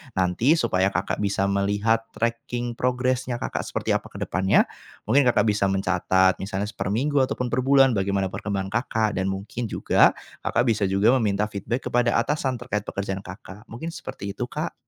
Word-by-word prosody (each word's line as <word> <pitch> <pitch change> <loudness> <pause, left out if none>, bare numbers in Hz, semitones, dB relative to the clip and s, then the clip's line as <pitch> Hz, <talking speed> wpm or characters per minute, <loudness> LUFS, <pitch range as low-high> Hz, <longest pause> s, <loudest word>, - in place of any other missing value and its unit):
nanti 95 - +3
supaya 95 - +1
Kakak 90 +3 -1
bisa 100 -1 0
melihat 105 +3 +1
tracking 120 +1 -2
progresnya 125 -1 -1
Kakak - - -3
seperti - - -2
apa - - -12
ke - - -8
depannya, 95 +2 +3 0.5
mungkin 140 +3 +5
Kakak 120 -2 +3
bisa 105 -1 +1
mencatat 95 -1 +2
misalnya 100 +1 -3
se 110 - -14
perminggu 135 +9 0
ataupun 125 -1 0
perbulan 135 +1 +4
bagaimana 95 0 0
perkembangan 95 -2 -3
Kakak 110 -2 0
dan 95 - 0
mungkin 100 +5 -4
juga 110 - +3 0.3
Kakak 120 - +2
bisa 110 -2 +1
juga 105 +7 +3
meminta 105 -2 0
feedback 110 +6 -3
kepada 120 -1 +2
atasan 130 +1 0
terkait 105 -5 -3
pekerjaan 95 -1 -4
Kakak. 95 +3 -11
Mungkin 120 +9 -6
seperti 100 - -7
itu - - -1
Kak. - - -4
105 Hz, 165 wpm, -24 LUFS, 95-125 Hz, 0.5 s, mungkin